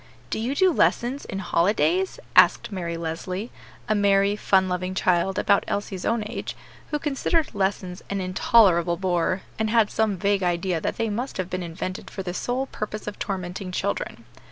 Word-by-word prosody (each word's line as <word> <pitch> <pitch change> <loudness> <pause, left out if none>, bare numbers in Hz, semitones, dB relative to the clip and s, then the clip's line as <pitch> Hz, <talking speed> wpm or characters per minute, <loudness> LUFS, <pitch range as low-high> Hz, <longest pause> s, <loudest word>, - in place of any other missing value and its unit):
"Do - - -1
you 245 +5 -1
do 370 +2 +4
lessons 260 0 +1
in 195 - -5
holidays?" 215 - +1 0.2
asked - - +5
Mary 170 -4 -3
Leslie, 180 +6 -4 0.4
a 215 - +2
merry, 200 -1 +3
fun 190 -2 +3
loving 185 +1 -2
child, 185 +1 +1
about 200 - +3
Elsie's 195 -2 -3
own 230 -2 +1
age, 210 - -5 0.3
who 300 - 0
considered 295 +2 0
lessons 190 -2 -2
an 200 - -1
intolerable 185 -2 +4
bore, 185 0 0 0.2
and 220 0 +1
had 225 -2 +3
some 215 -3 +1
vague 200 +2 +1
idea 175 -1 0
that - - -2
they 225 -2 0
must 245 +6 -3
have 185 -1 -3
been 185 0 -2
invented 180 +2 -5
for 195 - -6
the 180 -1 -4
sole 250 +7 -1
purpose 215 -4 -5
of 210 - -6
tormenting 185 -1 -4
children. - - -3
195 Hz, 175 wpm, -25 LUFS, 180-220 Hz, 0.4 s, asked